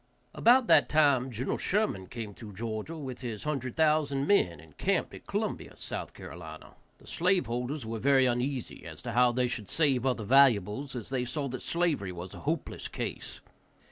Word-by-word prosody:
About 245 +2 +5
that - - +5
time 140 -4 +4
Gen. 125 +2 -2
Sherman 185 - 0
came 110 -2 -6
through 105 0 -10
Georgia 110 - -4
with 130 -5 -6
his 115 -5 -5
hundred 135 -5 -3
thousand 150 -3 +2
men, 90 - +3
and 80 -2 -16
camped - - 0
at - - -12
Columbia, - - -3
S.C. - - -7 0.2
The 80 -2 -12
slave 180 +1 +2
holders 125 +3 -3
were 115 0 -4
very 135 +1 +4
uneasy 125 +1 -2
as - - -9
to 120 - -4
how 125 +1 +4
they 125 +1 +1
should 115 -5 -5
save 140 -6 +2
other 125 -4 0
valuables, 130 +1 +4
as 120 -2 -6
they 130 -2 -1
saw 140 +3 -3
that 130 0 -5
slavery 165 - 0
was 90 +1 -7
a - - -9
hopeless 155 +1 -3
case. - - -5
125 Hz, 175 wpm, -30 LUFS, 110-145 Hz, 0.2 s, About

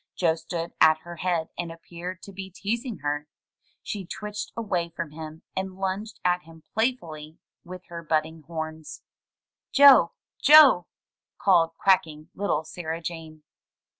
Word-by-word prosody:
Joe 165 -3 +2
stood 165 +1 -5
at 155 0 +7
her 175 0 -10
head 170 -2 -1
and 170 -1 -3
appeared 175 +2 -8
to 200 - -9
be 190 0 -7
teasing 225 +5 -3
her. 145 +1 -2 0.6
She 205 -2 -4
twitched 210 +1 -6
away 185 -7 -1
from 165 -2 -6
him, 155 0 -9
and 190 0 -3
lunged 195 +3 -3
at 180 0 +2
him 165 -2 -16
playfully 165 -10 -2 0.3
with 180 +1 -9
her 170 -1 -6
budding 160 0 -1
horns. 160 -1 -6 0.7
93 285 - +8
MY - - +13
BOOK 170 - -7
HOUSE - - -48 0.3
"Joe! 290 - +4
Joe!'' 180 - +3 0.5
called 165 -4 +3
quaking 160 -5 +1
little 185 -6 -1
Sarah 160 0 -5
Jane. 160 -2 -7
170 Hz, 155 wpm, -26 LUFS, 160-190 Hz, 0.7 s, MY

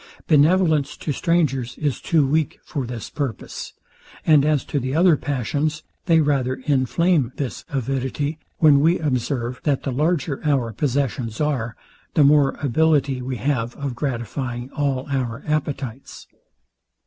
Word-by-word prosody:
Benevolence 155 -1 +3
to 150 - -3
strangers 140 -6 0
is 145 -4 -2
too 160 -5 +2
weak 155 +2 0
for 135 -4 -4
this 120 -2 -6
purpose; 140 -6 -5 0.5
and 150 -3 +6
as 150 -2 +1
to 145 - -1
the 130 +2 -3
other 170 0 +5
passions, 145 +3 -2 0.2
they 165 -2 +5
rather 135 -4 +1
inflame 145 +1 +2
this 135 -4 -4
avidity, 135 +3 -2 0.2
when 150 -3 +6
we 165 +5 +4
observe, 125 -4 -2
that 145 -3 0
the 135 - -2
larger 150 +1 0
our 135 -7 +1
possessions 125 -3 -1
are, 130 -7 -1 0.4
the 150 - +6
more 140 -1 +4
ability 140 -1 +2
we 130 +1 -3
have 120 -1 -1
of 140 -2 -4
gratifying 120 0 -4
all 140 -3 -1
our 130 -1 -2
appetites. 140 -4 -3
140 Hz, 135 wpm, -22 LUFS, 130-150 Hz, 0.5 s, and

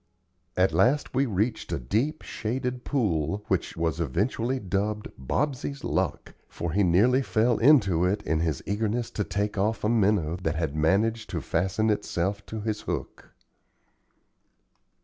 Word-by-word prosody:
At 90 -3 +3
last 125 - +2
we 135 +1 +2
reached 110 +2 -1
a - - 0
deep, 115 - -1
shaded 125 +2 -3
pool, 100 - -1
which 95 -3 -1
was 80 -2 -1
eventually 115 +6 0
dubbed 105 +2 -2
"Bobsey's 140 - -2
Luck;" - - -2 0.2
for 85 - -4
he 100 +5 +2
nearly 105 +10 +4
fell 120 -2 +1
into 105 - +5
it 100 +3 0
in 80 +1 0
his 80 -4 -1
eagerness 110 +3 -1
to 105 - -1
take 100 0 -2
off 105 +2 0
a 105 - +2
minnow 100 -7 +2
that 80 -2 -1
had 80 -3 -2
managed 110 +8 +1
to 85 - -2
fasten 95 +8 0
itself 100 -1 -1
to 110 -1 -5
his 105 0 -2
hook. - - -5
105 Hz, 150 wpm, -27 LUFS, 90-115 Hz, 0.2 s, into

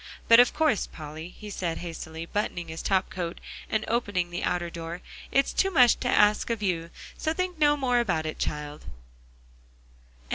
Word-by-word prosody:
But 230 0 +8
of 245 - +7
course, 310 - +2
Polly," 155 +2 -8
he 210 +3 -10
said 170 -4 -2
hastily, 165 -1 -6
buttoning 175 -3 -3
his 160 0 -5
top 190 -1 +1
coat, 175 -2 -4 0.3
and 215 0 0
opening 205 -7 0
the 175 - -3
outer 175 -1 -1
door, 170 +1 -6 0.3
"it's 275 0 +2
too 385 - +2
much 250 -10 +5
to - - -2
ask 210 +2 +4
of 230 -2 -2
you; 170 -4 -1 0.3
so 315 - 0
think 365 -1 -3
no 295 -1 +4
more 250 -3 +2
about 175 -9 0
it, 155 - -4
child." 150 0 -4
185 Hz, 175 wpm, -27 LUFS, 165-240 Hz, 0.3 s, But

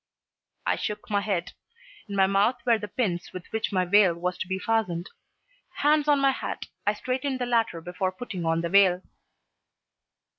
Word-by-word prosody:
I - - +1
shook 210 0 -5
my 205 -1 +2
head. 195 -4 -2 0.6
In 200 - -4
my 195 -1 +5
mouth 200 +5 +3
were 235 -2 +4
the 210 - -5
pins 180 -6 -2
with 180 -1 -7
which 220 0 -1
my 185 -2 +1
veil 190 -1 +5
was 180 +1 -2
to - - -3
be 190 0 -1
fastened. 190 -4 -1 0.7
Hands 300 +1 +3
on 290 -1 +4
my 275 0 +4
hat, - - -5 0.2
I 210 - +3
straightened 260 +4 -2
the 250 - -2
latter 230 -8 +1
before 180 +2 -2
putting 185 -3 -6
on 165 0 +1
the 170 - -2
veil. 185 -1 +5
200 Hz, 180 wpm, -26 LUFS, 180-230 Hz, 0.7 s, my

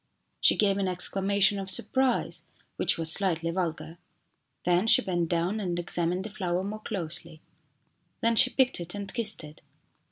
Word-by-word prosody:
She - - +4
gave 200 -2 +2
an 195 - 0
exclamation 195 +2 +2
of 195 0 -6
surprise, 260 +6 0 0.3
which - - +1
was 165 -1 +1
slightly 170 -3 +2
vulgar. 165 -1 -4 0.6
Then 180 +4 +1
she - - +5
bent 175 -3 -2
down 175 +5 -1
and 180 -4 -3
examined 175 +1 -1
the 215 - -8
flower 185 -3 -2
more 210 +2 -5
closely. 170 -4 -6 0.8
Then 230 0 +1
she 255 +3 +6
picked 260 -3 +1
it 175 +2 -5
and 200 -1 -5
kissed 220 -7 0
it. 150 0 -13
185 Hz, 160 wpm, -27 LUFS, 170-205 Hz, 0.8 s, she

